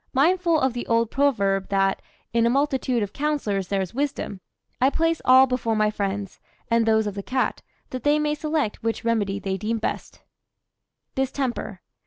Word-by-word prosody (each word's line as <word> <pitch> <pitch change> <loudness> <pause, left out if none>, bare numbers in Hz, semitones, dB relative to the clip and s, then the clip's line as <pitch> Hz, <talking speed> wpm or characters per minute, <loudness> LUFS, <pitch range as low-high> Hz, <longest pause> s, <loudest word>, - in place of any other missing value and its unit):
Mindful 335 +4 +3
of 265 -3 +1
the 240 - -5
old 230 -1 +2
proverb 200 -9 +1
that 195 -1 +1 0.3
"In 230 0 +3
a - - +3
multitude 260 -3 +1
of 200 - -5
counsellors 275 -11 -1
there 195 0 0
is 185 - -8
wisdom," 265 -7 -3 0.4
I 260 - +5
place 330 +2 0
all 260 +1 +8
before 245 -3 -1
my 215 0 +2
friends, 200 -1 -3 0.3
and 230 -1 +3
those 220 -1 +3
of 205 - -3
the 200 - -5
cat, 255 +5 -1 0.3
that 255 - -4
they 290 +4 +3
may 300 0 0
select 300 -6 -2
which 225 0 -2
remedy 210 -4 +1
they 195 -1 -3
deem 220 +4 -2
best: 220 - -5 0.9
DISTEMPER. 260 -7 -2
230 Hz, 175 wpm, -24 LUFS, 205-275 Hz, 0.9 s, all